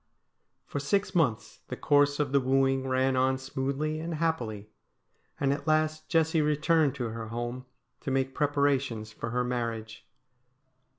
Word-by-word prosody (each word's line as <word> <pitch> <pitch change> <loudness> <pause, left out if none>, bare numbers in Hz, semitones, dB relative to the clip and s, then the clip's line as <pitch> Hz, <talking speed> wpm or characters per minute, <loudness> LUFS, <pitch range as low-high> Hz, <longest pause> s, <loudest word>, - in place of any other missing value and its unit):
For 145 - -4
six 190 +7 0
months 140 - 0
the - - -5
course 145 0 +3
of 145 -3 0
the 140 - +4
wooing 135 0 +2
ran 130 0 +2
on 130 +1 +2
smoothly 135 +4 -2
and 165 +1 -4
happily, 115 -11 -2 0.7
and 140 -1 +2
at 145 - -6
last 155 0 +1
Jessie 160 -1 +3
returned 150 -1 +2
to 125 -4 -3
her 110 0 -6
home 120 +3 -5 0.3
to - - -5
make 135 0 0
preparations 140 -6 0
for 115 +1 -5
her 125 +2 0
marriage. 115 -3 -4
135 Hz, 145 wpm, -29 LUFS, 125-150 Hz, 0.7 s, the